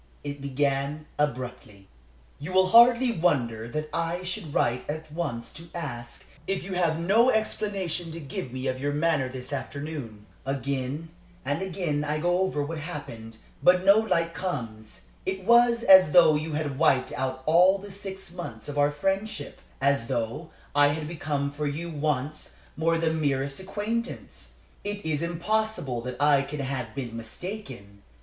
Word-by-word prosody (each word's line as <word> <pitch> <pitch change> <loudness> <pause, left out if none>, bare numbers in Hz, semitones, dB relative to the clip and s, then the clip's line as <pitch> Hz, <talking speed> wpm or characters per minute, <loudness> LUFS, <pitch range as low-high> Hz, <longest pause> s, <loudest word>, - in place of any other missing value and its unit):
It 145 -1 -5
began 140 +2 -1
abruptly: 125 -8 -3 0.5
"You 160 +6 -6
will 185 0 +5
hardly 235 +3 +7
wonder 120 - 0
that 155 +4 -3
I 170 +2 -1
should 180 -3 -4
write 125 -1 0
at 155 +1 -5
once 145 -8 -3
to 165 +3 -10
ask 120 -8 -6 0.2
if 195 -1 -1
you 190 +1 -5
have 170 -3 +1
no 210 +9 +4
explanation 195 -7 -1
to 165 - -7
give 135 -4 -6
me 130 +1 -5
of 130 0 -2
your 145 +1 0
manner 155 -2 +2
of 130 - -10
this 130 +2 -7
afternoon. 140 -6 -5 0.2
Again 135 +3 -3 0.4
and 145 +5 -1
again 175 -6 -1
I 150 +1 -1
go 175 +2 +2
over 185 -6 0
what 160 +2 -4
happened, 120 -9 -7 0.2
but 180 +1 +5
no 200 +2 +7
light 170 -6 0
comes. 115 - -5 0.2
It 190 0 -3
was 235 +1 +5
as 190 -7 +8
though 165 -3 +8
you 155 +1 -2
had 150 -3 -2
wiped 135 -5 +3
out 130 0 -3
all 180 +5 +6
the 200 +1 -10
six 190 -2 -7
months 115 -12 -7
of 145 0 -3
our 145 0 +5
friendship; 195 +2 -2 0.2
as 140 -4 +2
though 120 +6 -2 0.2
I 145 0 +6
had 150 +1 -2
become 145 -3 -2
for 150 +1 -3
you 165 +4 -4
once 150 -1 -2 0.2
more 165 +1 +2
the 165 -1 +1
merest 140 -3 0
acquaintance. 215 +5 -4 0.3
It 205 -1 -4
is 155 -1 0
impossible 170 - -1
that 125 +1 -6
I 145 -1 +5
can 140 +2 -5
have 130 -4 -4
been 125 -4 -5
mistaken. 115 - -7
150 Hz, 165 wpm, -27 LUFS, 135-180 Hz, 0.5 s, as